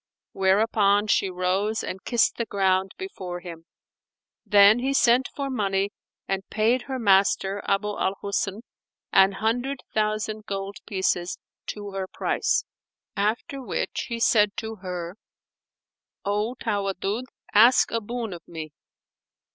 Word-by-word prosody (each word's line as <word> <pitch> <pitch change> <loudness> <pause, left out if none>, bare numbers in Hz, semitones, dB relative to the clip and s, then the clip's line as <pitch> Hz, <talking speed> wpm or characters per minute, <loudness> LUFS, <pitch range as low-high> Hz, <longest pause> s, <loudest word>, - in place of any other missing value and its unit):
whereupon 200 +1 +3
she 200 -2 +2
rose 185 +4 0
and 185 - -6
kissed 240 -2 +2
the 235 - -1
ground 190 -1 +1
before 185 - -6
him. 170 -2 -10 0.8
Then 205 +2 +6
he 270 +2 0
sent 245 +1 +4
for 280 -1 -2
money 200 -6 0 0.4
and 195 0 -1
paid 225 +4 +2
her 265 -1 -3
master 200 -2 +3
Abu 195 +1 +1
al 200 -1 -1
Husn 200 +1 -2 0.5
an 195 0 +6
hundred 245 +6 -1
thousand 215 0 -1
gold 195 0 -4
pieces 185 -2 -1 0.3
to 205 -1 -6
her 195 -1 -4
price; 455 - 0 0.5
after 220 +7 -1
which 255 - -3
he 235 -1 -3
said 210 -3 +3
to 220 0 -5
her, 180 -1 -6 1.1
"O 210 +4 0
Tawaddud, 205 0 -2 0.3
ask 235 +5 +6
a 230 - 0
boon 230 -1 -4
of 170 - -9
me!" 160 -2 -7
205 Hz, 130 wpm, -25 LUFS, 195-225 Hz, 1.1 s, Then